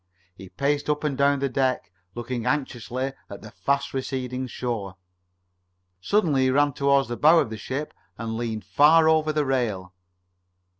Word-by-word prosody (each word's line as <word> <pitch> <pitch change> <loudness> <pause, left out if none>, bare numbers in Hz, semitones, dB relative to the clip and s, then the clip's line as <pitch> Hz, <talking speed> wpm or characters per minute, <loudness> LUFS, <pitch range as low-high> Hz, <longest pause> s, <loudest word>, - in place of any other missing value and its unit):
He 95 +1 -12
paced 145 +4 -1
up 150 0 0
and 150 -3 -1
down 140 +1 +3
the 140 - +1
deck, 130 -8 -1 0.2
looking 120 0 -4
anxiously 130 -2 -2 0.2
at - - -10
the - - -10
fast 140 0 -1
receding 130 -1 -3
shore. 115 -6 -4 1.1
Suddenly 155 - +2
he - - +3
ran 145 +2 +2
toward 140 0 +2
the 120 - -4
bow 155 +3 +6
of 115 - +1
the - - -4
ship 135 +8 -5 0.2
and 115 -1 -4
leaned 115 -2 -4
far 160 +2 +5
over 155 -1 +3
the 150 -1 0
rail. 110 -9 -2
135 Hz, 160 wpm, -24 LUFS, 120-145 Hz, 1.1 s, bow